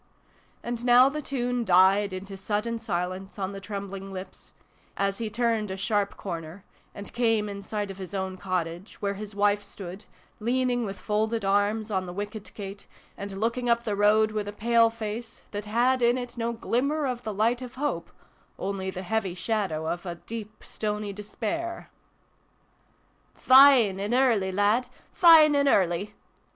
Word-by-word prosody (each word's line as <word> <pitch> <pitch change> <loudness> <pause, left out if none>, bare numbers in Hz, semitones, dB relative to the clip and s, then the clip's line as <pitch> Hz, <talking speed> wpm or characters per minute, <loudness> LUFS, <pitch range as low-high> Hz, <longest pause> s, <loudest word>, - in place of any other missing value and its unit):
And 240 0 -4
now 250 +2 +7
the 300 +2 -4
tune 245 -3 -1
died 190 +1 +4
into 195 +1 -6
sudden 210 +4 -2
silence 185 -2 -4
on 195 -1 -2
the 195 - -7
trembling 195 -1 -6
lips, 185 0 -9 0.4
as 195 +1 0
he 225 -2 -2
turned 225 -1 0
a 190 - -4
sharp 205 0 -1
corner, 170 0 -6 0.3
and 200 - -8
came 225 -3 +1
in 200 -1 -6
sight 205 0 -4
of 195 - -11
his 190 +1 -7
own 190 -1 -2
cottage, 180 0 -4
where 200 -1 -1
his 205 0 -8
wife 205 0 +2
stood, 195 -1 -9 0.3
leaning 245 +1 0
with 195 0 -6
folded 220 +1 -1
arms 205 +2 +1
on 190 -2 -1
the 175 - -6
wicket 205 +2 -6
gate, 200 -1 -8 0.3
and 195 -1 -6
looking 235 +3 -1
up 235 0 +3
the 215 -3 -1
road 215 +1 +4
with 210 -1 -3
a - - -3
pale 230 +2 +3
face, 225 0 -6
that 205 0 -5
had 245 +4 +2
in 240 +1 +4
it 245 -1 -6
no 235 -1 -1
glimmer 275 +6 -1
of 250 -2 -2
the 220 - -4
light 225 +5 +1
of 250 -1 -8
hope 290 +2 -2 0.5
only 195 -1 -3
the 185 0 -6
heavy 195 -1 -1
shadow 185 -5 -2
of 175 +2 -3
a 175 - -4
deep 215 +3 -8
stony 210 -1 -3
despair. 225 - -5 0.8
" - - -39
Fine 255 -7 +7
an' 205 +4 -1
early, 230 -8 +3
lad! 205 +6 +2 0.3
Fine 320 -4 +7
an' 280 0 +3
early 195 -2 +2
210 Hz, 170 wpm, -27 LUFS, 195-235 Hz, 0.8 s, now